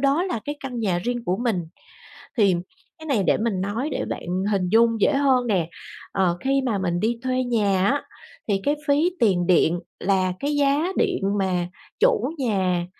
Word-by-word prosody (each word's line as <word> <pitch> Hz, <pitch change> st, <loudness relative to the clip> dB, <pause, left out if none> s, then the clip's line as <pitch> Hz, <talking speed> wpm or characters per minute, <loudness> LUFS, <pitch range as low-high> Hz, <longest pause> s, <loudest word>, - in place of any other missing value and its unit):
đó 280 Hz, +4 st, +2 dB
là 360 Hz, -, -2 dB
cái 290 Hz, 0 st, -4 dB
căn 255 Hz, -3 st, -5 dB
nhà 190 Hz, -6 st, +1 dB
riêng 240 Hz, +5 st, -3 dB
của 180 Hz, -, 0 dB
mình. 225 Hz, -7 st, -1 dB, 0.8 s
Thì 200 Hz, -4 st, +5 dB, 0.4 s
cái 315 Hz, -, -10 dB
này 255 Hz, -9 st, +1 dB
để -, -, +3 dB
mình 215 Hz, -4 st, -1 dB
nói 210 Hz, +9 st, -2 dB
để -, -, -2 dB
bạn -, -, -5 dB, 0.3 s
hình 185 Hz, -3 st, 0 dB
dung 230 Hz, +1 st, +3 dB
dễ 295 Hz, -, +4 dB
hơn 265 Hz, -3 st, +2 dB
nè. 180 Hz, -7 st, +1 dB, 0.4 s
Ờ, 180 Hz, -3 st, +1 dB
khi 275 Hz, 0 st, +1 dB
mà 215 Hz, -5 st, 0 dB
mình 175 Hz, -2 st, -1 dB
đi 230 Hz, +3 st, 0 dB
thuê 255 Hz, 0 st, 0 dB
nhà 205 Hz, -6 st, +1 dB
á, 285 Hz, +6 st, +1 dB, 0.5 s
thì 200 Hz, -2 st, +1 dB
cái 290 Hz, -, +2 dB
phí 295 Hz, +5 st, +3 dB
tiền 185 Hz, -6 st, +3 dB
điện 175 Hz, -1 st, +3 dB, 0.2 s
là 185 Hz, -1 st, +1 dB
cái 290 Hz, +1 st, -1 dB
giá 290 Hz, +5 st, +2 dB
điện 385 Hz, -, +1 dB, 0.2 s
mà 180 Hz, -2 st, 0 dB, 0.3 s
chủ 465 Hz, -, +3 dB
nhà 190 Hz, -8 st, 0 dB
230 Hz, 190 wpm, -23 LUFS, 190-275 Hz, 0.8 s, Thì